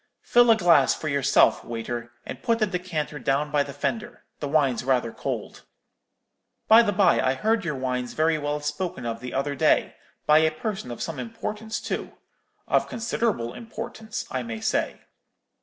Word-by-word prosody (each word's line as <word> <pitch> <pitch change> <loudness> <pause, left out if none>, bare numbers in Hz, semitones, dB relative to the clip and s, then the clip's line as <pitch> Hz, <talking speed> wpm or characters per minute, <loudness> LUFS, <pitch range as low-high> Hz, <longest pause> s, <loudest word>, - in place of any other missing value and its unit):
Fill 240 0 +5
a 225 - +6
glass 170 -8 +5
for 155 - -6
yourself, 140 -2 +3
waiter, 120 +1 -5
and - - -7
put 230 -1 +1
the 215 - +2
decanter 175 -6 -3
down 140 +3 0
by 145 -1 +3
the 140 - -3
fender; 210 - -4 0.2
the 145 - -3
wine's 140 -5 +2
rather 125 -3 +1
cold. - - -5 1.1
By 225 +1 +8
the 220 -3 +1
bye, 200 -1 +4
I 130 +1 +1
heard 220 +7 +1
your 160 -4 -2
wines 125 -2 -3
very 160 0 +2
well 145 0 -2
spoken 150 -1 -3
of 115 -1 -3
the 125 +1 -7
other 140 +2 0
day, 135 - +2 0.3
by 150 +1 +6
a 160 0 +4
person 190 - -5
of 120 - -5
some 160 -5 -5
importance, 210 - -5
too—of - - -4
considerable 220 - -1
importance, 225 -1 -6
I 130 - -1
may 115 -2 -5
say.' - - -1
150 Hz, 170 wpm, -25 LUFS, 130-210 Hz, 1.1 s, By